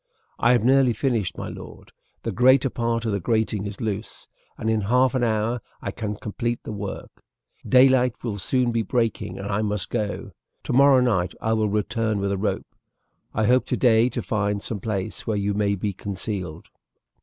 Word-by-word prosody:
"I 120 Hz, +2 st, +5 dB
have 120 Hz, -3 st, +2 dB
nearly 130 Hz, 0 st, +4 dB
finished, 115 Hz, -, -1 dB
my -, -, -5 dB
lord, -, -, -10 dB, 0.3 s
the -, -, -2 dB
greater 130 Hz, +1 st, +4 dB
part 115 Hz, -1 st, -1 dB
of 110 Hz, -, 0 dB
the 100 Hz, -, 0 dB
grating 110 Hz, 0 st, 0 dB
is 100 Hz, -1 st, -7 dB
loose, 110 Hz, -1 st, -4 dB, 0.3 s
and 110 Hz, -, -4 dB
in 110 Hz, -1 st, +2 dB
half 125 Hz, +6 st, +3 dB
an 130 Hz, -2 st, +1 dB
hour 115 Hz, +1 st, 0 dB, 0.2 s
I 100 Hz, -, -4 dB
can 105 Hz, 0 st, -4 dB
complete 120 Hz, +3 st, -3 dB
the -, -, -6 dB
work. 100 Hz, -2 st, -7 dB, 0.5 s
Daylight 130 Hz, -1 st, +5 dB
will 105 Hz, -4 st, -3 dB
soon 125 Hz, +4 st, +1 dB
be 115 Hz, 0 st, +1 dB
breaking 110 Hz, -3 st, -1 dB
and 100 Hz, -, -5 dB
I 105 Hz, +1 st, 0 dB
must 105 Hz, -2 st, -2 dB
go. 105 Hz, -4 st, -3 dB, 0.3 s
Tomorrow 135 Hz, 0 st, +5 dB
night 95 Hz, -8 st, +1 dB
I 110 Hz, -, 0 dB
will 110 Hz, -1 st, +1 dB
return 105 Hz, +1 st, 0 dB
with 100 Hz, 0 st, -1 dB
a 100 Hz, -, 0 dB
rope. 100 Hz, -1 st, -3 dB, 0.6 s
I 110 Hz, -, +2 dB
hope 125 Hz, +3 st, +3 dB
today 120 Hz, -1 st, +3 dB
to -, -, -4 dB
find 105 Hz, -1 st, -1 dB
some 110 Hz, -, -4 dB
place 100 Hz, 0 st, -4 dB
where 110 Hz, -2 st, 0 dB
you 100 Hz, 0 st, 0 dB
may 100 Hz, 0 st, +1 dB
be 100 Hz, +1 st, -3 dB
concealed." 95 Hz, -3 st, -5 dB
110 Hz, 185 wpm, -24 LUFS, 100-120 Hz, 0.6 s, I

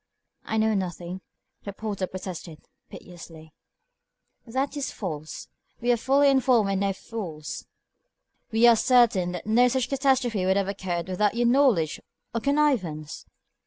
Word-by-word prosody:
"I 220 Hz, -, -2 dB
know 220 Hz, 0 st, +2 dB
nothing," 180 Hz, -1 st, -4 dB, 0.4 s
the 200 Hz, -, -7 dB
porter 200 Hz, -2 st, -4 dB
protested, 180 Hz, -4 st, -8 dB, 0.3 s
piteously. 165 Hz, -3 st, -12 dB, 0.9 s
"That 265 Hz, +5 st, -2 dB
is 285 Hz, -2 st, -3 dB
false. 155 Hz, -6 st, -6 dB, 0.3 s
We 240 Hz, +1 st, +1 dB
are -, -, +4 dB
fully 275 Hz, +4 st, +3 dB
informed 250 Hz, -6 st, +3 dB
and 195 Hz, -, 0 dB
no 200 Hz, 0 st, +1 dB
fools. 185 Hz, -7 st, -7 dB, 0.8 s
We 225 Hz, +1 st, +4 dB
are 235 Hz, -1 st, +8 dB
certain 225 Hz, -7 st, +3 dB
that 180 Hz, -, -6 dB
no 235 Hz, +4 st, +4 dB
such 255 Hz, 0 st, -1 dB
catastrophe 260 Hz, -7 st, +1 dB
could 190 Hz, +1 st, +2 dB
have 200 Hz, -1 st, 0 dB
occurred 185 Hz, -3 st, -3 dB
without 200 Hz, +3 st, 0 dB
your 240 Hz, 0 st, +1 dB
knowledge 240 Hz, -, +3 dB, 0.3 s
or 230 Hz, -, -2 dB
connivance." 240 Hz, -, 0 dB
205 Hz, 140 wpm, -25 LUFS, 180-245 Hz, 0.9 s, are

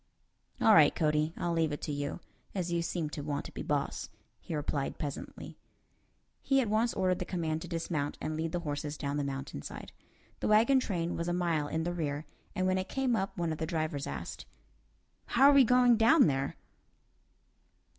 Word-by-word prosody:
"All 220 Hz, -, +6 dB
right, 155 Hz, -6 st, +6 dB
Cody, 155 Hz, -1 st, +1 dB
I'll 175 Hz, -1 st, -1 dB
leave 165 Hz, -2 st, +1 dB
it 145 Hz, -, -5 dB
to -, -, -2 dB
you, 145 Hz, +4 st, -3 dB, 0.3 s
as 180 Hz, -2 st, -2 dB
you 170 Hz, 0 st, +1 dB
seem 165 Hz, -2 st, -2 dB
to 150 Hz, -, -5 dB
want 145 Hz, 0 st, -3 dB
to -, -, -8 dB
be -, -, -6 dB
boss," 145 Hz, -1 st, -2 dB, 0.3 s
he 165 Hz, -, -5 dB
replied, 145 Hz, -1 st, -2 dB
pleasantly. 145 Hz, -2 st, -6 dB, 0.8 s
He 270 Hz, -1 st, +2 dB
at 250 Hz, -, +1 dB
once 225 Hz, +3 st, +1 dB
ordered 185 Hz, -2 st, +1 dB
the -, -, -1 dB
command 160 Hz, -3 st, -2 dB
to 175 Hz, -, -7 dB
dismount 165 Hz, -4 st, -2 dB
and 155 Hz, -, -3 dB
lead 160 Hz, +1 st, -2 dB
the 175 Hz, -, -2 dB
horses 145 Hz, -1 st, -4 dB
down 140 Hz, 0 st, -2 dB
the 145 Hz, -, 0 dB
mountain 135 Hz, -, -5 dB
side. -, -, -8 dB, 0.5 s
The -, -, -1 dB
wagon 225 Hz, +6 st, +5 dB
train 175 Hz, -8 st, -2 dB
was 170 Hz, -, -3 dB
a 175 Hz, -, 0 dB
mile 170 Hz, -4 st, 0 dB
in 160 Hz, +2 st, -2 dB
the 175 Hz, +1 st, -2 dB
rear, 150 Hz, -3 st, -3 dB, 0.3 s
and 185 Hz, -, 0 dB
when 185 Hz, 0 st, +2 dB
it 185 Hz, -, -4 dB
came 265 Hz, -3 st, +1 dB
up 195 Hz, -2 st, -2 dB
one 170 Hz, -2 st, -1 dB
of 155 Hz, -, -4 dB
the 160 Hz, -, -2 dB
drivers 155 Hz, -4 st, -2 dB
asked, -, -, -6 dB, 0.9 s
"How 275 Hz, +3 st, +8 dB
are -, -, +4 dB
we 280 Hz, -1 st, +8 dB
going 245 Hz, 0 st, +5 dB
down 235 Hz, +7 st, +6 dB
there?" 135 Hz, -2 st, 0 dB
165 Hz, 200 wpm, -31 LUFS, 150-185 Hz, 0.9 s, How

